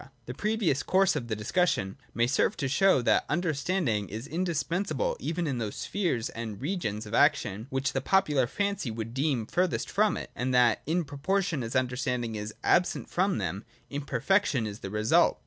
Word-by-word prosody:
The 125 - -5
previous 205 - 0
course 190 +2 +3
of 125 -5 -3
the 110 - -1
discussion 105 - 0 0.2
may 120 - +3
serve 125 +2 +1
to 140 - -1
show, 145 -1 +3
that - - +3
understanding 150 - 0
is 110 +5 -6
indispensable 180 - -1
even 170 +1 -2
in 135 -5 -1
those 110 -3 -3
spheres 170 - -1
and 110 -3 -6
regions 130 - -3
of 105 - -9
action 105 0 +2
which 135 +1 -1
the 135 - 0
popular 150 -7 +2
fancy 200 -4 -1
would 115 +1 -5
deem 135 -4 0
furthest 180 +8 0
from 210 -1 +2
it, - - -7
and 130 +1 -1
that 120 -3 +4
in 170 +3 +1
proportion 165 +2 -1
as 115 +1 -5
understanding 125 -2 -1
is 105 0 -5
absent 180 0 +2
from 190 +2 +1
them, 95 +1 -3 0.3
imperfection 140 - +1
is 105 0 -6
the 95 - -6
result. 105 +2 +3
135 Hz, 175 wpm, -28 LUFS, 115-180 Hz, 0.3 s, that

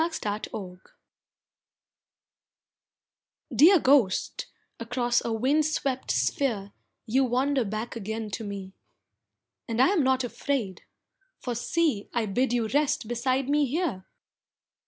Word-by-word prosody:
A 335 - 0 0.4
WELCOME 185 -3 -7 2.7
Dear 365 +6 +8
Ghost, 255 -10 +2 0.3
across 240 +1 0
a 230 - -2
wind 265 +7 +2
swept 275 -4 -2
sphere 215 -9 0 0.3
You 260 +5 +2
wander 260 +2 +1
back 215 +3 -4
again 220 0 -4
to 225 - -4
me, 200 -2 -6 0.9
And 230 0 -2
I 260 - +6
am 385 -5 +2
not 260 -1 +2
afraid, 245 -5 -3 0.6
for 245 - -3
see 245 -1 0
I 235 -2 +1
bid 240 +5 0
you 235 -2 +1
rest 285 -4 +1
beside 255 +3 0
me 290 0 +2
here! 265 - -2
245 Hz, 115 wpm, -27 LUFS, 220-275 Hz, 2.7 s, Dear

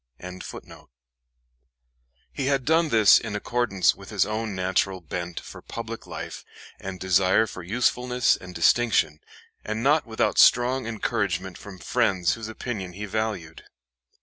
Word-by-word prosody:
] - - -54 2.2
He 135 - -3
had 135 -2 +1
done 160 +1 +3
this 110 -6 +6
in 110 -2 -5
accordance 105 -3 +1
with - - -13
his - - +2
own 110 -1 -3
natural 95 0 0
bent 85 +1 -5
for - - -11
public - - -7
life - - -7 0.4
and 95 -1 -7
desire 95 +4 +3
for 95 - -8
usefulness 125 +5 +1
and 90 -1 -11
distinction, 85 -4 +3 0.4
and 110 +2 -3
not 145 0 +3
without 110 -1 0
strong 125 0 +5
encouragement 100 -5 -2
from 100 +1 -10
friends 95 -4 +1
whose 115 -1 -6
opinion 110 -5 -5
he 105 +3 -6
valued. 105 -6 -4
105 Hz, 135 wpm, -25 LUFS, 95-120 Hz, 2.2 s, this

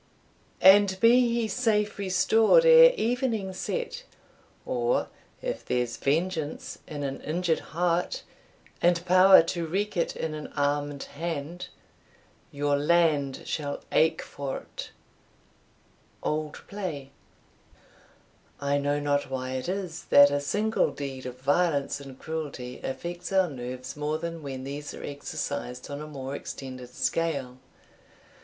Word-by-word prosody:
And 190 0 +7
be 240 +2 +5
he 235 -1 0
safe 210 -2 0
restored 220 - +4
ere - - +9
evening 230 - -1
set, 485 - -4 0.6
Or, - - 0 0.3
if - - -3
there's 125 -1 -1
vengeance 160 +1 -2
in 145 -2 -5
an 135 -1 -4
injured 170 +1 0
heart, 175 - -1 0.6
And 175 0 +2
power 185 0 +8
to 165 0 -3
wreak 205 +6 -2
it 170 - 0
in 160 -1 -3
an 150 -1 -6
armed 145 -1 -1
hand, 165 +2 -5 0.8
Your 145 0 +1
land 150 -3 +2
shall 145 -2 -3
ache 160 +1 +3
for't. 140 -2 -6 1.3
Old 155 0 -2
Play. 165 -9 -5 1.5
I 140 0 +1
know 145 +1 0
not 145 -1 0
why 130 -1 -3
it 130 +5 -3
is 185 -4 -4
that 145 0 +7
a 145 0 0
single 210 +10 +1
deed 135 -2 -6
of 125 0 -8
violence 145 0 +1
and 135 -2 -10
cruelty 145 -6 -6
affects 175 +6 -5
our 190 -4 +3
nerves 130 0 -6
more 150 +1 -1
than 165 0 -5
when 135 -3 -6
these 145 +2 -6
are - - -9
exercised 145 -3 -5
on 145 +1 -5
a 155 - -7
more 135 -2 -6
extended 130 -3 -7
scale. 130 0 -2
155 Hz, 125 wpm, -27 LUFS, 140-185 Hz, 1.5 s, ere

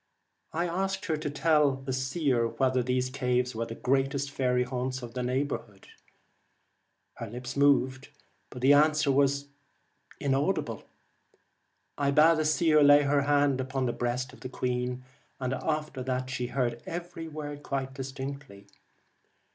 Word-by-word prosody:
I 170 +2 -1
asked 190 +3 -2
her 160 -2 0
to 150 -1 -3
tell 150 0 +3
the 135 0 -5
seer 130 -2 +1
whether 130 +1 +1
these 125 +1 -1
caves 125 -2 0
were 115 +1 -3
the 115 - -6
greatest 135 +2 0
faery 125 -2 +1
haunts 130 0 -3
in 120 - -7
the 125 - -4
neighbourhood. 125 -6 -3 1.3
Her 115 - -6
lips 125 +3 -6
moved, 135 -1 +2 0.4
but 125 - -9
the 140 +2 +7
answer 150 0 +4
was 140 +1 +2 0.7
inaudible. 140 - -1 1.1
I 140 -1 +2
bade 155 +3 +5
the 155 - +1
seer 155 0 +4
lay 145 0 +7
her 140 0 +2
hand 145 -2 +2
upon 130 0 -2
the 120 - -1
breast 125 +1 -2
of - - -14
the 130 - -7
queen, 125 0 -2 0.4
and 130 -1 -2
after 150 0 -2
that 130 0 -2
she 125 -1 -2
heard 120 -2 -1
every 170 -1 -6
word 145 -2 -6
quite 135 -2 -3
distinctly. 135 -5 -7
135 Hz, 145 wpm, -28 LUFS, 125-145 Hz, 1.3 s, the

